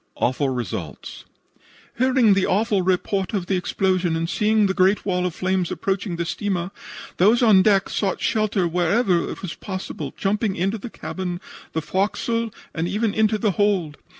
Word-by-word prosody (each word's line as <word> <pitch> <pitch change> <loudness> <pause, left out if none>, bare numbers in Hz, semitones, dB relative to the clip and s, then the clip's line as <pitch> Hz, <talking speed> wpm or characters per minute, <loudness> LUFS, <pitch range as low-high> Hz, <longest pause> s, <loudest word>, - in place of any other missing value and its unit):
AWFUL 135 +2 +1
RESULTS 125 -7 -5 0.7
"Hearing 255 -4 +4
the 195 -1 +2
awful 205 0 +2
report 190 +2 0
of 190 -3 -1
the 190 - 0
explosion 185 -1 0
and 165 0 -1
seeing 215 +3 +2
the 190 - +1
great 190 +2 +2
wall 180 -2 0
of 175 - -6
flames 185 -1 0
approaching 195 -3 -2
the 170 0 -2
steamer, 185 0 -2 0.5
those 220 +7 +4
on 210 -5 +7
deck 195 -1 +3
sought 195 -3 -1
shelter 215 -5 +1
wherever 175 +2 +1
it - - -7
was 180 - -4
possible, 190 -2 -6
jumping 205 0 0
into 195 +5 -1
the 235 - -7
cabin, 180 -4 -5 0.3
the 160 - -2
forecastle 215 +7 -1 0.2
and 165 +1 -1
even 210 +3 0
into 220 0 +2
the 210 -1 +1
hold. 190 -7 0
190 Hz, 165 wpm, -22 LUFS, 180-210 Hz, 0.7 s, on